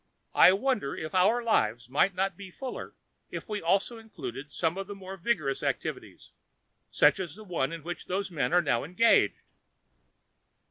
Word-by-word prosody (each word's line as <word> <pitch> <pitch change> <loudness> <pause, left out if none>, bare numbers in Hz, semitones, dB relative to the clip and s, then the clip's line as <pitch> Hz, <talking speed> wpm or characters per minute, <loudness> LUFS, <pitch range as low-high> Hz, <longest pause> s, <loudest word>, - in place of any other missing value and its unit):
I - - +8
wonder 205 - 0
if 155 -1 -6
our 205 +6 +3
lives 120 - +1
would 165 +9 +2
not 195 +1 0
be 200 -2 -10
fuller 255 +7 -7 0.3
if - - -6
we 210 -2 -3
also 195 +7 +1
included 145 - -8
some 165 0 0
of 195 0 -5
the 205 - -7
more 190 -1 -8
vigorous 170 -8 -1
activities, - - -4 0.6
such - - +4
as 175 -4 -5
the 215 - -11
one 165 -8 -1
in 165 -2 -7
which 175 +2 -6
those 190 +1 -2
men 150 -6 -1
are 175 0 +4
now 120 -6 +1
engaged." 180 +9 +3
185 Hz, 170 wpm, -29 LUFS, 155-205 Hz, 0.6 s, I